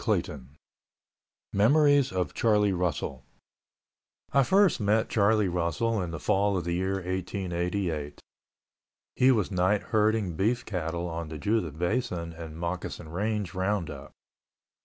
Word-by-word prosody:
CHAPTER - - +2
XIX 65 - -13 1.1
MEMORIES 145 +6 +4
OF 90 -2 -2
CHARLIE 105 -3 +2
RUSSELL 80 -7 -2 1.1
I 140 - +5
first 195 +7 +4
met 105 +1 +1
Charlie 105 -1 +3
Russell 90 +6 0
in 90 - -3
the 80 -1 -5
fall 100 0 +1
of 90 - -2
the 85 +1 -2
year 95 +2 0
1888. 90 -3 -3 1.0
He 130 +1 +5
was 105 -5 +1
night 95 +2 +2
herding 110 -3 +2
beef 115 +7 0
cattle 85 -3 -3
on 85 -1 -5
the 80 - -6
Judith 85 -2 -1
Basin 90 -3 -2
and 80 -1 -9
Moccasin 85 -1 -4
Range 100 +2 -2
roundup. 95 -1 -2
95 Hz, 130 wpm, -28 LUFS, 85-105 Hz, 1.1 s, I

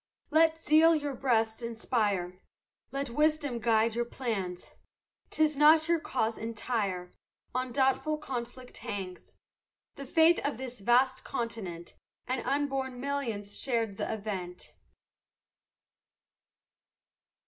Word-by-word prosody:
Let 320 +1 +4
zeal 325 +1 +5
your 290 -2 -2
breasts 225 -3 +1
inspire; 210 -6 -1 0.5
Let 275 -2 -3
wisdom 300 -2 +1
guide 225 0 +2
your 240 +1 0
plans; 215 -8 -4 0.6
'Tis 310 -1 +2
not 310 +2 +6
your 335 -1 +3
cause 230 -7 -1
entire, 205 -5 -3 0.4
On 255 0 -2
doubtful 270 +4 +1
conflict 255 -3 -6
hangs; 190 -3 -6 0.6
The 275 - -7
fate 325 +4 +5
of 285 -5 -2
this 250 -2 -7
vast 255 +5 +3
continent, 195 -9 -5 0.3
And 255 -1 -2
unborn 270 -2 -1
millions 240 -7 -3
share 235 -4 +1
th' 200 -3 -12
event. 195 -5 -5
245 Hz, 105 wpm, -30 LUFS, 220-280 Hz, 0.6 s, not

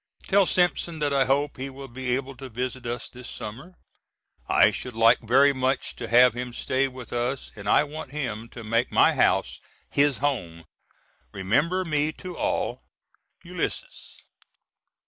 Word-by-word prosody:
Tell 200 -1 +3
Simpson 175 -2 +1
that 145 -2 0
I 135 -1 +3
hope 140 +2 0
he 135 +1 -4
will 135 0 -9
be 125 0 -2
able 135 0 -5
to 130 +1 -8
visit 125 +1 -4
us 120 +1 -4
this 125 -1 -11
summer. 135 - -8 0.7
I - - +5
should 125 -3 -6
like 115 +1 +5
very 135 +5 +4
much 130 0 -1
to 115 - -5
have 125 +1 +6
him 125 0 -5
stay 130 +3 0
with 125 -2 -10
us 125 +3 -2
and 100 -1 -6
I - - +5
want 150 0 -7
him 120 -6 -4
to 115 - -10
make 115 +3 0
my - - +5
house - - +1 0.3
his 140 -2 +3
home. 85 - -2 0.7
Remember 150 - +1
me 150 -1 0
to 180 +1 -8
all. - - -1 0.6
ULYSSES. - - -5
130 Hz, 160 wpm, -25 LUFS, 120-145 Hz, 0.7 s, have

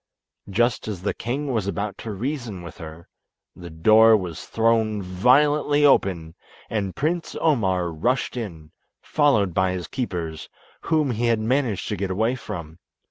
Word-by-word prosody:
Just 120 +4 +1
as 95 -4 -5
the 105 - 0
king 135 +4 -3
was 110 -4 -1
about 100 +1 -3
to 110 - -6
reason 115 -3 -4
with 85 - -10
her, 80 0 -10 0.5
the 90 -1 -10
door 110 +7 +6
was 90 -5 -6
thrown 115 -2 +1
violently 145 +10 +3
open, 85 - +2 0.4
and 100 -4 -2
Prince 165 +3 -2
Omar 95 - +1
rushed 120 +15 -1
in, 85 -10 -7 0.3
followed 110 - +2
by 95 +2 +1
his 90 -2 -4
keepers, 85 - -4 0.3
whom 155 -4 +1
he 120 +1 -1
had 115 -1 +3
managed 115 -3 0
to 105 - -1
get 95 +1 -2
away 110 +6 +1
from. 85 -10 -7
105 Hz, 150 wpm, -23 LUFS, 90-125 Hz, 0.5 s, door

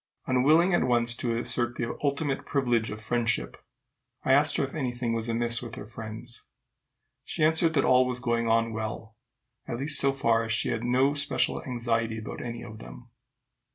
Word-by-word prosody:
Unwilling 155 +8 +3
at 175 - +3
once 120 -1 +2
to 115 -1 -2
assert 120 0 -1
the 120 -1 -3
ultimate 140 0 -1
privilege 120 -5 0
of 110 - -6
friendship, 110 - -1 0.7
I 130 - +4
asked 145 +2 +5
her - - +1
if 135 - -4
any 130 -5 -2
thing 120 -1 -2
was 115 0 -2
amiss 115 0 0
with 120 -2 -7
her - - -8
friends. 115 +2 -9 0.8
She 155 - -2
answered 160 +1 +4
that 140 - +3
all 130 0 +4
was 125 -1 -2
going 120 -1 0
on 115 0 +2
well, 110 0 -5 0.5
at 120 - -3
least 140 +3 +1
so 135 - +3
far 115 -4 +1
that 115 - -5
she 115 +3 +1
had 115 - -2
no 130 +3 +2
special 145 0 0
anxiety 115 -3 -1
about 110 - -7
any 120 -1 -6
of 110 -2 -10
them. - - -12
120 Hz, 190 wpm, -27 LUFS, 115-135 Hz, 0.8 s, asked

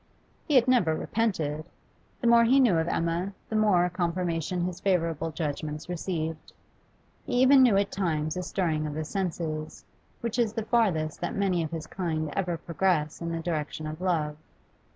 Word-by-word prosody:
He 300 - +2
had 255 -1 +5
never 220 -12 +3
repented. 155 -9 -1 0.6
The - - -3
more 235 0 +6
he 255 +4 +5
knew 240 -9 +5
of 160 0 0
Emma, 170 +4 -1 0.2
the 220 - -3
more 205 -5 +4
confirmation 175 -1 -1
his 180 -1 -3
favourable 165 -4 0
judgments 155 0 -4
received. 165 -3 -4 0.7
He - - -5
even 260 +2 +6
knew 235 -6 +5
at 200 0 +1
times 155 -5 -1
a 180 - -2
stirring 160 -5 -1
of 150 - -5
the 155 0 -3
senses, 160 -4 -4 0.4
which 235 +1 -2
is 225 -3 +2
the 225 -2 -3
farthest 180 -11 +1
that 175 - -2
many 190 -3 +1
of 160 - -2
his 165 -1 -5
kind 160 -4 -3
ever 180 -3 -1
progress 165 -2 0
in 170 0 -3
the 165 0 -3
direction 155 -2 -3
of 155 +2 -6
love. 155 -5 0
175 Hz, 175 wpm, -27 LUFS, 155-200 Hz, 0.7 s, more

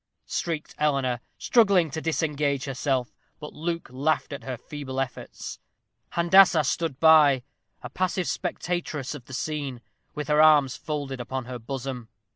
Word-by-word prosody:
shrieked 165 -3 -3
Eleanor, 135 -5 +1 0.2
struggling 195 - +3
to 160 - -4
disengage 150 -4 0
herself. 135 -2 -1 0.3
But 150 -1 -8
Luke 165 +1 -3
laughed 145 +3 0
at 140 - -7
her 130 -2 -4
feeble 135 0 -6
efforts. 135 -2 -5 0.5
Handassah 170 -1 +6
stood 155 0 -1
by, 150 -5 +6 0.4
a 125 - -6
passive 185 +2 -1
spectatress 165 -6 -3
of 140 -5 -9
the 130 - -12
scene, 140 -3 -3 0.4
with 150 -1 -4
her 150 0 +4
arms 150 -4 +5
folded 145 -5 -4
upon 130 +1 -4
her 125 0 -6
bosom. 125 -1 -5
145 Hz, 140 wpm, -26 LUFS, 130-160 Hz, 0.5 s, Handassah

